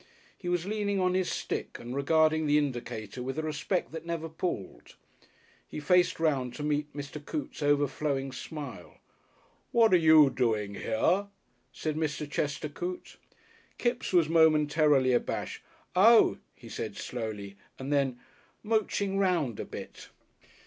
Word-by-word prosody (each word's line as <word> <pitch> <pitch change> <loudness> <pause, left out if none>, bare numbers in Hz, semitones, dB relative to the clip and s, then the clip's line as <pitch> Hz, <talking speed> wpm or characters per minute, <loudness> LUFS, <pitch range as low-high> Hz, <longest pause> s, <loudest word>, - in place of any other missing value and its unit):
He 175 - -6
was 175 -1 0
leaning 205 -1 -1
on 180 -1 +2
his 185 -1 +1
stick - - -4
and 120 +2 -7
regarding 160 +2 +3
the 145 0 +4
indicator 120 -5 -3
with 130 +3 -4
a 155 - -1
respect 155 +4 -2
that 160 - -6
never 165 -1 -3
palled. 155 - -5 0.7
He - - -6
faced 180 +4 +3
round 135 -6 0
to 150 - -5
meet 150 0 -1
Mr. 145 +1 -7
Coote's 295 - -5
overflowing 145 -1 0
smile. 130 - -8 0.7
"What 225 -4 +5
are - - +8
you 155 -4 +6
doang 110 -6 0
hea?" 185 - +1 0.4
said 155 -1 -3
Mr. 150 -1 -2
Chester 150 +1 -2
Coote. 175 +5 -6 0.6
Kipps 240 0 -1
was 175 -4 +4
momentarily 150 -4 +4
abashed. 120 - -2 0.3
"Oh," 220 +5 +6 0.2
he - - -14
said - - -5
slowly, 105 -5 -5 0.2
and 135 +2 -3
then, 135 -3 +1 0.4
"Mooching 205 -2 0
round 170 - +1
a - - -3
bit." - - -9
150 Hz, 140 wpm, -29 LUFS, 135-175 Hz, 0.7 s, are